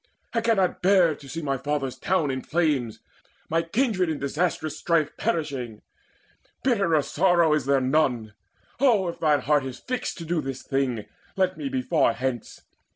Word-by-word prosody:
I 230 - +1
cannot 215 -5 +1
bear 185 -3 +4
to 140 -2 -13
see 165 +2 -5
my 135 -2 -1
fathers' 145 -2 -2
town 165 -6 +1
In 130 0 -3
flames, 145 -9 0 0.5
my 165 +1 +2
kindred 185 0 0
in 155 - -1
disastrous 155 +2 -1
strife 165 -3 +1
Perishing: 135 - -3 0.8
bitterer 195 - +2
sorrow 170 -1 +3
is 150 -4 0
there 140 -1 +3
none! 130 -6 +1 0.5
Oh, 230 -9 +3
if 170 - -7
thine 150 -4 +3
heart 145 +1 +2
is 130 -1 -6
fixed 255 0 -4
to 165 - -7
do 165 0 0
this 135 -2 -6
thing, 130 -6 -1 0.3
Let 185 -1 +1
me 280 - -4
be 265 -1 -2
far 160 - +2
hence! 125 0 -4
155 Hz, 165 wpm, -25 LUFS, 135-185 Hz, 0.8 s, bear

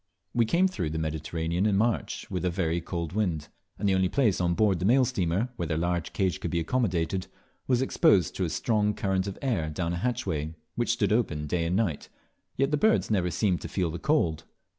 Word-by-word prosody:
We 120 -1 +3
came 170 +11 +3
through 90 - -3
the 80 - -3
Mediterranean 80 +4 -1
in 100 -2 +2
March, 115 +1 0
with 90 -1 -2
a 90 - +2
very 85 -1 -1
cold 85 -1 -4
wind; 90 -8 -1 0.3
and 100 - -1
the 95 - +3
only 95 -1 +2
place 110 -8 +2
on 85 -1 +1
board 100 -4 +2
the 90 - -1
mail 130 +5 +5
steamer 95 +3 0
where 85 - -2
their 80 - -1
large 85 0 -1
cage 95 -3 0
could 85 - -3
be 85 - 0
accommodated 90 -2 0 0.4
was 125 0 +2
exposed 95 -9 +3
to 95 - 0
a 85 - 0
strong 105 +2 +1
current 95 -1 0
of 100 - -5
air 105 -13 0
down 85 +2 -2
a - - -2
hatchway 80 -8 -2 0.2
which 120 - -1
stood 105 -4 +1
open 75 -10 0
day 85 +2 -1
and 85 +2 0
night, 95 -9 -1 0.5
yet 135 +2 +2
the 150 - +2
birds 220 - +2
never 90 -4 +2
seemed 90 -1 0
to - - -5
feel 90 -4 -1
the 85 - -5
cold. 140 - +1
95 Hz, 220 wpm, -28 LUFS, 85-110 Hz, 0.5 s, mail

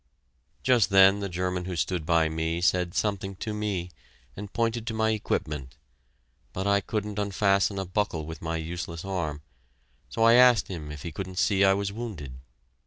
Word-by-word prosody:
Just 120 -7 +4
then 95 +1 +6
the 100 -1 -3
German 90 0 -2
who 90 -1 -4
stood 85 0 -2
by 85 -2 +3
me 80 +1 -2
said 90 0 +1
something 100 -2 -1
to 110 +3 -5
me, 100 -4 -3 0.4
and 100 0 -8
pointed 115 0 -1
to 110 - -2
my 110 0 +2
equipment, 75 - -3 0.8
but 95 - -3
I 100 0 +3
couldn't 105 0 -3
unfasten 100 0 +1
a 95 - -2
buckle 90 -4 -2
with 80 -1 -8
my 80 0 -2
useless 85 +1 -5
arm, 80 -6 -3 0.7
so 115 - -1
I 115 0 +7
asked 125 -2 +6
him 80 -5 -6
if 75 -1 -8
he 85 - -5
couldn't 95 +2 -6
see 95 +2 +3
I 95 0 +5
was 100 0 -2
wounded. 100 - -6
95 Hz, 175 wpm, -27 LUFS, 85-105 Hz, 0.8 s, I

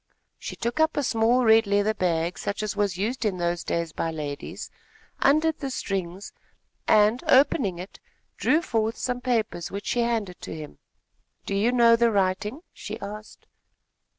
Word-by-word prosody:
She - - -6
took 235 +6 -3
up 315 0 +2
a 290 - +1
small, 240 +1 +2
red 220 -1 +5
leather 205 +2 +2
bag, 175 -3 -1
such 200 +1 -3
as 210 - -3
was 200 -3 0
used 230 +6 -2
in 205 -4 0
those 175 0 -1
days 170 -1 -2
by 165 - -2
ladies, 150 -3 -6 0.5
undid 310 +3 +3
the 275 - -3
strings 195 -5 -4 0.5
and, 215 +3 +4
opening 260 -8 +3
it, 180 +3 -9 0.4
drew 320 +3 +2
forth 225 -6 -1
some 250 -1 -3
papers, 225 -8 -1
which 200 +1 -6
she 240 - 0
handed 225 -6 -2
to - - -6
him. 155 -2 -9 0.7
"Do - - -3
you 210 +5 +2
know 235 -2 +6
the 235 0 +3
writing?" 210 - -1
she - - -7
asked. 210 +2 -9
215 Hz, 165 wpm, -25 LUFS, 185-240 Hz, 0.7 s, know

